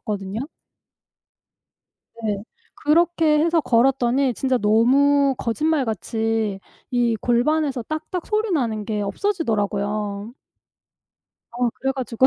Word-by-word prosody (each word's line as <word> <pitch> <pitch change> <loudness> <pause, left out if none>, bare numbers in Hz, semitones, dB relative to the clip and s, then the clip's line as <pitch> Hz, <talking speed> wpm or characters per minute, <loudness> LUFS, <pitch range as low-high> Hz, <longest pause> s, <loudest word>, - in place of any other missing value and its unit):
같거든요. 210 +6 -4 1.7
네. 205 -2 -2 0.4
그렇게 325 0 +3
해서 330 +1 +3
걸었더니 255 0 +2
진짜 260 -2 0
너무 270 +6 +4
거짓말같이 225 - -1 0.3
이 240 -2 +1
골반에서 260 +4 +1
딱딱 310 +6 -5
소리 430 0 0
나는 230 - -1
게 215 -1 -2
없어지더라고요. 205 - -2 1.2
어. 245 0 0
그래 270 0 0
가지고 260 -1 +1
245 Hz, 235 characters per minute, -22 LUFS, 215-300 Hz, 1.7 s, 너무